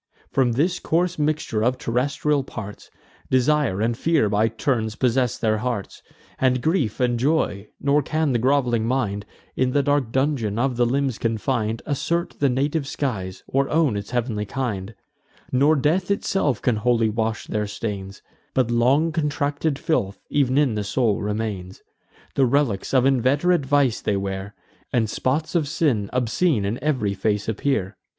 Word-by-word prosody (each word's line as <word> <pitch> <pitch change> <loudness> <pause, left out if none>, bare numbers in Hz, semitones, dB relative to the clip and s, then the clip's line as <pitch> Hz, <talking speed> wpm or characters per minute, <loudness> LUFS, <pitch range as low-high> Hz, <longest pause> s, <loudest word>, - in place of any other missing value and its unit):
From 125 -3 +2
this 165 +9 +1
coarse 175 +1 0
mixture 150 -7 0
of 125 +2 +1
terrestrial 140 +4 0
parts, 105 -6 -8 0.4
Desire 130 -5 +2
and 115 +1 +1
fear 150 -4 +2
by 105 +2 +2
turns 115 -1 -1
possess 125 -1 +1
their 110 -1 +1
hearts, 120 -4 -4 0.4
And 130 -1 +3
grief, 155 - 0
and 120 -2 +1
joy; 120 -8 0
nor 145 +1 +2
can 155 +1 0
the 120 - +2
groveling 125 -3 +2
mind, 105 -6 -1 0.3
In 130 0 +1
the 145 - +3
dark 145 -4 +1
dungeon 130 -6 0
of 130 +1 +1
the 120 0 +2
limbs 135 -1 0
confin'd, 115 0 -1
Assert 170 +4 -2
the 140 - +3
native 140 +3 0
skies, 100 -11 -3
or 135 +1 0
own 155 -7 +2
its 100 0 -5
heav'nly 115 -4 -1
kind: 110 -5 -3 0.6
Nor 140 +5 +4
death 165 +7 +1
itself 170 - 0
can 125 -4 +2
wholly 115 0 +2
wash 110 0 -2
their 105 -1 -2
stains; 100 -2 -5 0.3
But 125 -3 +2
long 135 +8 +3
contracted 145 -1 -1
filth 120 -12 -1
ev'n 135 -2 +2
in 145 -5 +3
the 105 -1 -2
soul 110 0 0
remains. 105 -3 -4 0.5
The 135 -2 +3
relics 125 -6 0
of 130 -1 +4
inveterate 135 +5 +2
vice 140 -4 +2
they 100 - 0
wear, 95 +1 -4 0.4
And 115 -3 +2
spots 135 +8 -1
of 165 -5 +1
sin 140 -10 0
obscene 125 - +1
in 115 +6 -3
ev'ry 130 -10 0
face 105 +1 -1
appear. 110 -3 -1
125 Hz, 160 wpm, -23 LUFS, 110-145 Hz, 0.6 s, Nor